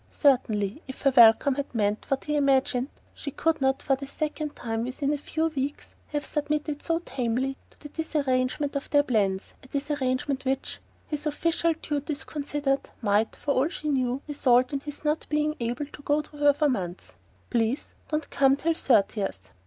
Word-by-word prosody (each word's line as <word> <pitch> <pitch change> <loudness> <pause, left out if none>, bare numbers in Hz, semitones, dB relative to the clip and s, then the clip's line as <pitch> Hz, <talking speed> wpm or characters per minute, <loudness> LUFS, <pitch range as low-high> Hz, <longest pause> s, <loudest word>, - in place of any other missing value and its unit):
Certainly, 230 -4 +2
if 265 - -8
her 275 -1 +4
welcome 235 +3 +7
had 280 -2 -4
meant 210 -1 0
what 270 -1 0
he 300 - -1
imagined, 270 -3 +2 0.3
she 285 - -6
could 320 +2 0
not, 265 0 +1
for 270 - +3
the 275 +1 -8
second 305 +1 -3
time 225 -1 -2
within 275 +4 -1
a - - 0
few 315 +2 -1
weeks, 285 -1 -4
have 295 -1 -3
submitted 295 0 -2
so 330 -1 +1
tamely 255 +1 -1
to - - -24
the 295 - -9
disarrangement 285 -3 0
of 280 - -3
their 290 -1 +5
plans; 200 -7 0
a - - -15
disarrangement 275 -1 -1
which 265 0 -2 0.3
his 300 0 -2
official 335 +2 +1
duties 295 0 -3
considered 285 -2 -2
might, 210 +1 +2
for 290 - -2
all 270 +4 +2
she 305 -4 -4
knew, 260 -1 0
result 255 -3 +3
in 280 - 0
his 295 +1 -8
not 300 +1 0
being 300 0 +1
able 240 +4 -2
to 285 - -13
go 295 +1 +1
to 300 - -17
her 290 0 +6
for 295 +1 +1
months. 185 -9 -3 0.4
"Please 235 +2 0 0.2
don't 305 -1 -1
come 270 -1 +4
till 330 +4 +1
thirtieth." 205 - +1
275 Hz, 180 wpm, -27 LUFS, 255-295 Hz, 0.4 s, welcome